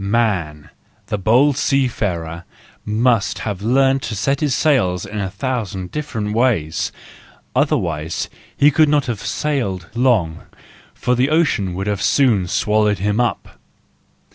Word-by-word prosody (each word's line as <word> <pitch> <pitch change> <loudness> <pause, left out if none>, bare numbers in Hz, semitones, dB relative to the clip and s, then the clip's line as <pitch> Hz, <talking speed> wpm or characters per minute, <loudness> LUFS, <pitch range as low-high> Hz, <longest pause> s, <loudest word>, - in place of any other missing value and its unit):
"Man," 100 -9 -1 0.4
the 105 - -1
bold 125 +8 +3
seafarer, 95 - -1 0.4
must 110 -1 +1
have 100 -3 -3
learned 135 +4 +2
to 110 - -4
set 135 +7 0
his 145 -4 +1
sails 95 - +1
in 105 +1 -5
a 95 -2 -2
thousand 105 -7 -4
different 115 -9 -3
ways, 105 -10 0 0.6
otherwise 80 0 0 0.3
he 145 +1 +5
could 155 +1 +4
not 145 -1 +2
have 120 -6 -4
sailed 100 - -2
long, 115 -10 +1 0.6
for 125 - 0
the 125 +3 +2
ocean 125 - +1
would 95 +1 -3
soon 125 -3 +3
have 90 -1 -4
swallowed 105 -1 +2
him 105 +4 0
up. 120 -1 -2
110 Hz, 135 wpm, -19 LUFS, 95-130 Hz, 0.6 s, he